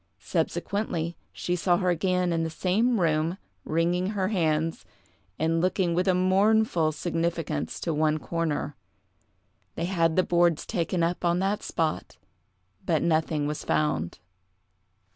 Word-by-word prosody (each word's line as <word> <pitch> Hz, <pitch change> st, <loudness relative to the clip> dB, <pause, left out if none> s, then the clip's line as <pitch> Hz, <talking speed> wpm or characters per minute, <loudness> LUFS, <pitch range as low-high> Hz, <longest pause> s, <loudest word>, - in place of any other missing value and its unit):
Subsequently, 175 Hz, -5 st, -2 dB, 0.2 s
she 180 Hz, -, -2 dB
saw 175 Hz, 0 st, +2 dB
her 185 Hz, -1 st, +1 dB
again 180 Hz, 0 st, +1 dB
in 165 Hz, -, 0 dB
the 165 Hz, -, -1 dB
same 210 Hz, +8 st, +1 dB
room, 165 Hz, +1 st, +1 dB, 0.3 s
wringing 175 Hz, +3 st, 0 dB
her 200 Hz, -2 st, -1 dB
hands, 160 Hz, -5 st, 0 dB, 0.5 s
and 165 Hz, +1 st, +1 dB
looking 185 Hz, -1 st, +1 dB
with 180 Hz, +3 st, +1 dB
a 185 Hz, -, +4 dB
mournful 190 Hz, -2 st, +3 dB
significance 165 Hz, -2 st, -2 dB
to 165 Hz, -, -2 dB
one 155 Hz, 0 st, +2 dB
corner. 155 Hz, -3 st, -2 dB, 1.0 s
They 165 Hz, -, -2 dB
had 165 Hz, -3 st, +1 dB
the 185 Hz, -, +4 dB
boards 175 Hz, -3 st, +2 dB
taken 175 Hz, -3 st, -1 dB
up 170 Hz, +2 st, -1 dB
on 170 Hz, 0 st, +2 dB
that 195 Hz, +3 st, 0 dB
spot, 160 Hz, -2 st, -2 dB, 0.7 s
but 160 Hz, -3 st, +1 dB
nothing 155 Hz, -2 st, +1 dB
was 150 Hz, 0 st, -3 dB
found. 85 Hz, -, 0 dB
170 Hz, 135 wpm, -27 LUFS, 160-185 Hz, 1.0 s, a